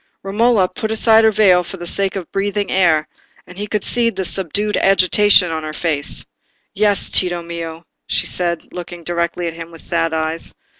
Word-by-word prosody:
Romola 205 0 +2
put 215 +4 -5
aside 220 0 +4
her 220 - +5
veil 195 -4 +4
for 190 - -8
the 175 - -8
sake 195 +3 -1
of 185 -4 -6
breathing 200 0 -2
the - - -2
air, 165 -5 +2 0.4
and 180 +2 -13
he 210 - -4
could 210 -1 -2
see 235 -1 +1
the 190 -4 -4
subdued 200 +4 -1
agitation 195 -1 +4
in 160 -1 -4
her 155 0 -6
face. 155 -3 +3 0.5
"Yes, 205 0 +1
Tito 175 -2 0
mio," 170 -1 -7 0.2
she - - 0
said, 170 -2 -3
looking 175 -1 -8
directly 170 +1 -2
at 165 - -3
him 165 0 -9
with 165 -1 -6
sad 165 -1 -1
eyes. 160 +1 -2
180 Hz, 190 wpm, -18 LUFS, 170-205 Hz, 0.5 s, her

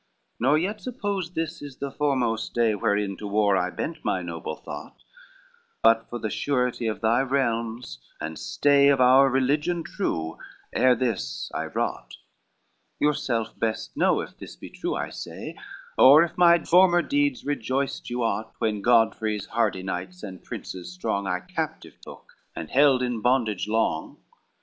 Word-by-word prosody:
XLIV - - -47
"Nor 135 +6 +3
yet 200 +6 -2
suppose 205 -8 -3
this 165 0 -3
is 140 -3 -9
the 140 -1 -4
foremost 130 -6 -1
day 115 -2 +3
Wherein 105 -1 0
to 105 - -6
war 100 -1 +2
I 90 -1 +1
bent 160 - -5
my 90 - -1
noble 85 -2 -5
thought, - - -10 0.8
But 115 0 +4
for 120 - -4
the 110 -3 -4
surety 125 -4 -1
of 110 - -3
thy 115 +3 +3
realms, 115 - -2 0.2
and 80 0 -5
stay 140 -1 +3
Of 140 -1 +4
our 130 +2 +6
religion 150 +6 +1
true, 155 - -3 0.3
ere 130 -1 +4
this 115 - -3
I - - -2
wrought: - - -3 0.8
Yourself 130 -6 0
best 110 -1 -2
know - - +2
if - - -9
this - - -10
be - - -11
true - - -3
I - - -3
say, - - -7 0.4
Or 145 +5 +9
if 170 0 -4
my 170 -2 +5
former 175 0 +5
deeds 285 -3 0
rejoiced 135 -1 -2
you 120 0 -2
aught, 110 0 -2
When 105 -2 -1
Godfrey's 110 -2 +2
hardy 105 -5 -1
knights 90 0 -5
and 95 -4 -8
princes 90 -1 -7
strong 95 +2 -2
I 90 0 -1
captive - - -5
took, - - -12 0.3
and 80 - -7
held 135 -2 +4
in 120 -3 -2
bondage 115 -5 +1
long. 105 -7 -1
120 Hz, 160 wpm, -25 LUFS, 105-145 Hz, 0.8 s, Or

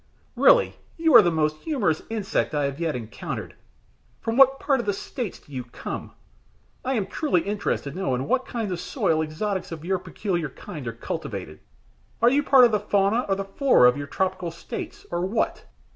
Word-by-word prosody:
Really - - +5 0.2
you 325 -2 +3
are 240 - +11
the 175 - +2
most 155 -2 0
humorous 210 - 0
insect 215 -7 -1
I 145 -1 +1
have 140 +2 -3
yet 165 -4 -1
encountered. 115 -2 -6 0.7
From 225 - -2
what 270 +1 +6
part 275 -3 +1
of 235 - -4
the 205 - +2
States 215 +1 -5
do - - -21
you 130 -2 -4
come? 120 - -7 0.7
I 265 +1 0
am 210 -5 0
truly 275 - 0
interested 200 -8 -2
to 185 - -7
know 190 -9 0
in 130 +3 -3
what 260 - +1
kind 225 -5 -3
of 175 - -3
soil 160 -1 0
exotics 185 +5 -3
of 165 -1 -7
your 190 0 0
peculiar 175 -5 -3
kind 140 0 -8
are - - -1
cultivated. 80 -8 -6 0.6
Are 235 +1 +5
you 285 +2 +3
part 270 -3 +7
of 235 - +3
the 210 - +2
fauna 205 +6 +1
or 195 - +3
the 195 0 -4
flora 195 - +4
of 125 - +4
your 145 0 -5
tropical 185 +2 -1
States 165 - -7
or 175 0 -1
what?" 210 +5 -1
190 Hz, 200 wpm, -25 LUFS, 155-235 Hz, 0.7 s, are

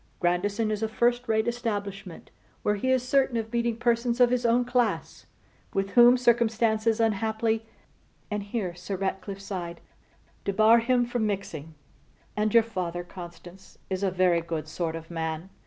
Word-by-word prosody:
Grandison 205 +5 0
is 210 0 -2
a 220 - +1
first 240 +2 +1
rate 220 0 +1
establishment, 205 -6 -4 0.3
where 210 - +2
he 210 +5 -2
is 255 -1 +2
certain 270 -2 +2
of 225 0 -4
meeting 235 -1 0
persons 235 0 +1
of 245 -1 +5
his 250 -1 +1
own 240 +1 +3
class, 245 -2 -1 0.5
with 195 0 0
whom 245 +2 +7
circumstances 230 -2 +2
unhappily,' 220 +1 0 0.6
and 210 0 -1
here 200 -3 -3
Sir 180 +3 -5
Ratcliffe 195 +1 -3
sighed, 180 -4 -6 0.6
'debar 215 +4 +5
him 245 +1 +2
from 240 -2 -1
mixing; 165 -6 -5 0.6
and 210 0 +1
your 230 +1 +6
father, 180 -6 -4
Constance, 175 +1 -12
is 190 0 -1
a 195 - +2
very 180 -2 +2
good 165 -2 -4
sort 165 0 -3
of 165 +1 -9
man. 160 +2 -4
215 Hz, 155 wpm, -27 LUFS, 185-235 Hz, 0.6 s, whom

